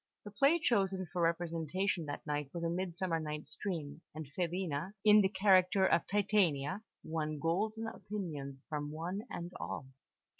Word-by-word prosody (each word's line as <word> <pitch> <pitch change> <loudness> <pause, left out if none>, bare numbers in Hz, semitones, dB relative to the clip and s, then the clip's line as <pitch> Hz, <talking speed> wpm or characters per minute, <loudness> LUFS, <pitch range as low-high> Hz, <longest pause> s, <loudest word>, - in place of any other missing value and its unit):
The 205 - -8
play 275 +11 +4
chosen 195 - +1
for 180 - 0
representation 170 +1 0
that 145 - -5
night 145 -2 -2
was 170 - -3
A 165 - +1
Midsummer 175 -1 -1
Night's 150 -1 -5
Dream; 160 -6 -4
and 155 0 -5
Filina, 175 -1 -1
in 210 0 +9
the 190 - +3
character 190 -1 +5
of 170 - +3
"Titania," 190 -4 +2 0.2
won 155 -1 -2
golden 210 +9 0
opinions 155 -12 -5
from 150 -1 -3
one 170 +6 -3
and 175 +1 -5
all. 130 - -5
175 Hz, 150 wpm, -34 LUFS, 155-195 Hz, 0.2 s, in